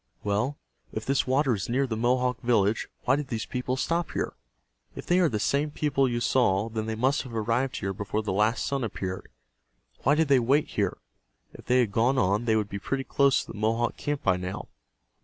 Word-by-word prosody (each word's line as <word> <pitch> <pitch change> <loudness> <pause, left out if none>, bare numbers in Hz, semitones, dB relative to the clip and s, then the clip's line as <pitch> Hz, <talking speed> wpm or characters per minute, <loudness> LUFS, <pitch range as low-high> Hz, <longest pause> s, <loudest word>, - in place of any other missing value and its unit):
Well, 105 +8 0 0.3
if - - -5
this 135 0 +1
water 135 0 +2
is 95 -1 -3
near 135 +3 +2
the 115 -4 -3
Mohawk 125 +2 +1
village, 115 -3 +2 0.2
why 130 - +3
did 145 -1 -3
these 115 -3 -3
people 125 +1 -3
stop 170 +5 -1
here? - - -2 0.6
If - - -7
they 175 +1 +3
are 175 -3 +4
the 110 -5 -2
same 140 +7 +1
people 140 -3 +1
you 120 0 -1
saw, 115 -4 +2
then 110 -1 -3
they 110 - -2
must 130 +5 +1
have 125 -3 -9
arrived 115 +4 0
here 95 0 -2
before 105 +2 -3
the 105 - -2
last 105 +4 +1
sun 135 -1 -1
appeared. 95 -4 -4 0.7
Why 140 +3 +3
did 160 0 +2
they 140 -2 +5
wait 135 +5 +2
here? - - -1 0.6
If - - -13
they 125 0 +4
had 115 -5 0
gone 120 +5 +2
on 100 +2 +2
they 110 -2 +3
would 105 -2 +1
be 100 0 -5
pretty 135 +6 -2
close 140 0 +2
to - - -9
the - - -9
Mohawk 115 +2 0
camp 145 -1 -3
by 95 -2 +3
now." 90 +2 -5
120 Hz, 215 wpm, -27 LUFS, 110-135 Hz, 0.7 s, they